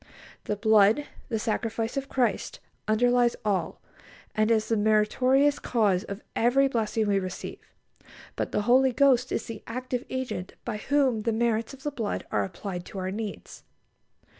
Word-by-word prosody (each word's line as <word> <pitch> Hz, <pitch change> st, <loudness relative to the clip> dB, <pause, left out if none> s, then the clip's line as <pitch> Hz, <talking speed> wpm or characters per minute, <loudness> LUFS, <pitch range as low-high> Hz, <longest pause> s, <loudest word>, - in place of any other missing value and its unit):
The 210 Hz, -, -1 dB
blood, 220 Hz, +5 st, +4 dB, 0.2 s
the 225 Hz, -, 0 dB
sacrifice 225 Hz, +1 st, -2 dB
of 275 Hz, 0 st, -3 dB
Christ, 250 Hz, -2 st, -1 dB, 0.3 s
underlies 245 Hz, +2 st, +3 dB
all, 200 Hz, -3 st, -1 dB, 0.5 s
and 215 Hz, 0 st, +2 dB
is 220 Hz, -1 st, +2 dB
the 225 Hz, -, +1 dB
meritorious 250 Hz, +7 st, +3 dB
cause 205 Hz, -6 st, +1 dB
of 200 Hz, +1 st, -7 dB
every 265 Hz, +4 st, +3 dB
blessing 225 Hz, -3 st, 0 dB
we 200 Hz, -1 st, +2 dB
receive, 185 Hz, -1 st, -6 dB, 0.8 s
but -, -, -3 dB
the 210 Hz, -, 0 dB
Holy 260 Hz, +4 st, +5 dB
Spirit 255 Hz, -1 st, +3 dB
is -, -, -1 dB
the 225 Hz, -2 st, -7 dB
active 250 Hz, +1 st, -3 dB
Agent 260 Hz, -8 st, -4 dB
by 230 Hz, -3 st, -3 dB
whom 260 Hz, -1 st, +1 dB
the 230 Hz, -, 0 dB
merits 230 Hz, +2 st, 0 dB
of 270 Hz, -, -19 dB
the 295 Hz, -, -2 dB
blood 230 Hz, -7 st, -3 dB
are -, -, +1 dB
applied 185 Hz, -1 st, -6 dB
to -, -, -9 dB
our 185 Hz, 0 st, -2 dB
needs. 210 Hz, +1 st, -6 dB
225 Hz, 160 wpm, -27 LUFS, 210-255 Hz, 0.8 s, Holy